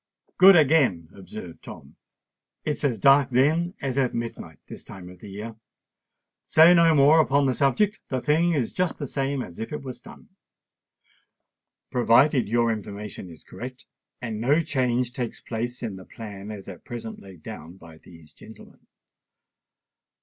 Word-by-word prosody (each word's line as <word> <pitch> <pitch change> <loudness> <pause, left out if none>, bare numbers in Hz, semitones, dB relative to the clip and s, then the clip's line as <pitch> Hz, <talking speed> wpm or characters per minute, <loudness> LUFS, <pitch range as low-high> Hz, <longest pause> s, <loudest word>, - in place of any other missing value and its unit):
"Good 195 +1 +9
again," 135 - +3
observed 95 -3 -10
Tom. - - -12 0.7
"It's 150 -1 -2
as 130 -6 +1
dark 135 +6 +5
then 155 +8 +1
as 135 0 -1
at 130 -2 0
midnight 115 -10 -6
this - - -10
time 90 -2 -11
of 90 0 -14
the 105 - -11
year. 110 +3 -8 0.9
Say 160 +3 +6
no 165 -2 +5
more 145 +3 +6
upon 145 -2 +3
the 130 - +2
subject: 185 - +1
the 130 - -1
thing 160 +6 +2
is 135 -7 -1
just 180 -2 -1
the 145 - -4
same 135 0 -2
as 85 - -11
if 110 - -5
it 150 - -5
was 130 -2 -8
done—provided 125 +1 -3
your 115 0 +2
information 105 -3 -7
is 80 - -14
correct, 125 +2 -9 0.3
and 110 -3 -5
no 145 +7 +2
change 125 -3 -1
takes 120 -3 -5
place 120 +2 -5
in 105 -5 -4
the 95 - -12
plan 105 -3 -9
as 105 -3 -8
at 90 -4 -10
present 115 -2 -7
laid 95 -5 -14
down 85 +4 -9
by 80 -3 -15
these 80 -3 -17
gentlemen. - - -16
120 Hz, 155 wpm, -25 LUFS, 100-145 Hz, 0.9 s, Good